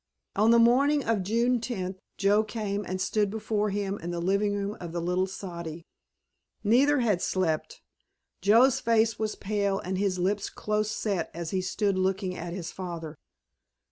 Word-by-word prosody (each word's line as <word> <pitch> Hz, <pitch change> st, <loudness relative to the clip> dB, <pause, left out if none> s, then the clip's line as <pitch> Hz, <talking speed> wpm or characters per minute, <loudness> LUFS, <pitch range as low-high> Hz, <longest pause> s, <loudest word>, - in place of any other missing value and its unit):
On 215 Hz, +3 st, +4 dB
the 235 Hz, -, +7 dB
morning 270 Hz, +5 st, +4 dB
of 225 Hz, -3 st, +1 dB
June 235 Hz, +5 st, +1 dB
tenth 190 Hz, -6 st, -4 dB, 0.2 s
Joe 205 Hz, +2 st, +3 dB
came 210 Hz, -2 st, -3 dB
and 185 Hz, +1 st, -3 dB
stood 205 Hz, +1 st, +1 dB
before 210 Hz, 0 st, -1 dB
him 200 Hz, 0 st, -2 dB
in 170 Hz, -, -5 dB
the 175 Hz, 0 st, -3 dB
living 200 Hz, +3 st, +1 dB
room 200 Hz, +1 st, -3 dB
of 170 Hz, -2 st, -6 dB
the 175 Hz, -, -1 dB
little 180 Hz, +2 st, 0 dB
soddy. 170 Hz, -4 st, -7 dB, 0.8 s
Neither 260 Hz, +6 st, +4 dB
had 210 Hz, -7 st, +1 dB
slept. 165 Hz, -5 st, -1 dB, 0.6 s
Joe's 230 Hz, +7 st, +5 dB
face 225 Hz, -1 st, +2 dB
was 215 Hz, -1 st, -1 dB
pale 200 Hz, -1 st, -1 dB
and 185 Hz, 0 st, -3 dB
his 195 Hz, -2 st, 0 dB
lips 195 Hz, +3 st, 0 dB
close 215 Hz, 0 st, -1 dB
set 200 Hz, -5 st, -2 dB
as 170 Hz, -1 st, -4 dB
he 190 Hz, -, 0 dB
stood 195 Hz, +1 st, 0 dB
looking 190 Hz, 0 st, 0 dB
at 175 Hz, 0 st, -5 dB
his 170 Hz, -2 st, -5 dB
father. 170 Hz, -4 st, -6 dB
200 Hz, 170 wpm, -28 LUFS, 185-215 Hz, 0.8 s, the